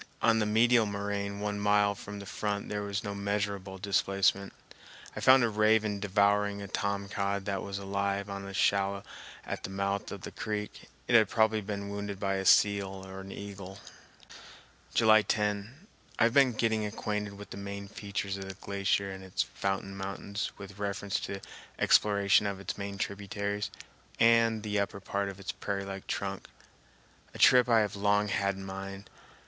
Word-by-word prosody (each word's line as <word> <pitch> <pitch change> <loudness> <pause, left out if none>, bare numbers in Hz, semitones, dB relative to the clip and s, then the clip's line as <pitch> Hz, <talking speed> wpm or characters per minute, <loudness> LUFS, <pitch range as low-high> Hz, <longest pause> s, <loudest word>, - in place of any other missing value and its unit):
On 115 -1 +4
the 105 - +1
medial 115 +1 +4
moraine 100 0 -3
one 105 -1 -2
mile 105 0 +3
from 100 0 -8
the 100 - -8
front 100 0 -3
there 105 0 -2
was 100 0 -3
no 100 - -3
measureable 100 -1 -2
displacement. 100 0 +1 0.6
I - - -4
found 130 -1 +7
a - - +4
raven 110 -1 +3
devouring 100 0 +2
a 100 - -6
tom 100 0 -2
cod 100 0 -2
that 100 -1 -2
was 100 0 -5
alive 100 0 -1
on 100 -1 -6
a - - -6
shallow 100 0 +1 0.4
at - - -4
the - - -4
mouth 100 +1 -2
of 100 - -6
the - - -7
creek. 105 -1 -5 0.2
It - - 0
had 110 -3 +6
probably 110 -1 +3
been 100 0 -4
wounded 100 -1 -4
by 95 -1 0
a 95 - -3
seal 100 -1 +4
or 95 0 -8
eagle. 95 -1 -8 1.2
July 110 -1 +6
10. 105 - -2 0.3
I - - +4
have 115 0 +4
been 135 -3 +5
getting 110 -1 +1
acquainted 105 -1 -3
with 105 - -11
the - - -6
main 100 0 -6
features 100 -1 -4
of 95 0 -6
the 95 - -6
glacier 100 0 -1
and 95 0 -8
its 95 - -1
fountain 95 0 -3
mountains 100 +2 -4
with 100 0 -10
reference 100 -1 -2
to 100 - -4
an 95 - -8 0.4
exploration 100 -1 +4
of 100 -1 -3
its 100 - -4
main 100 0 -5
tributaries 100 +1 -3 0.5
and 115 -1 +4
the 105 -1 0
upper 100 0 -2
part 100 0 -2
of 95 0 -9
its 95 - -4
prairie 100 -1 -3
like 95 0 -7
trunk, 100 -1 -3 0.9
a - - -6
trip 125 -1 +6
I 115 -2 +6
have 105 -2 -1
long 105 +1 +2
had 100 -3 0
in 95 0 -8
mind. 95 +1 -7
100 Hz, 180 wpm, -30 LUFS, 100-105 Hz, 1.2 s, found